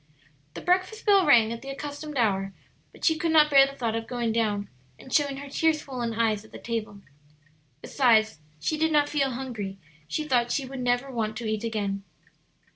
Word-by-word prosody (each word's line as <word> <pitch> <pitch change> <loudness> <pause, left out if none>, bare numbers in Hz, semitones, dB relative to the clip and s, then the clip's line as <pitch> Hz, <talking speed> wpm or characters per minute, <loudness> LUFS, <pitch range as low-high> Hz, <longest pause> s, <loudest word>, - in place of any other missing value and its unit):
The - - -6
breakfast 370 +5 0
bell 395 -5 +5
rang 230 -5 +5
at 230 - -8
the 275 - -8
accustomed 290 +1 -6
hour, 195 -4 0 0.4
but - - -7
she 320 -2 +3
could 330 +1 0
not 305 -1 +5
bear 275 -1 +7
the 275 - -9
thought 235 -4 -2
of 225 0 -4
going 240 -2 -1
down 210 -3 0 0.3
and 260 - -11
showing 285 -2 +2
her 280 +1 -8
tear 320 +3 +2
swollen 250 -6 -4
eyes 220 -2 +1
at 220 - -18
the - - -9
table. 220 -3 -5 0.8
Besides, 220 - +3 0.2
she 305 - -2
did 320 0 +2
not 295 -1 +3
feel 275 -2 +1
hungry; 225 -7 -5 0.3
she 310 - -2
thought 240 -3 +2
she 275 - -1
would 265 0 -7
never 245 +2 0
want 220 -3 -2
to 235 - -5
eat 215 0 -2
again. 200 -3 -2
245 Hz, 200 wpm, -26 LUFS, 220-290 Hz, 0.8 s, bear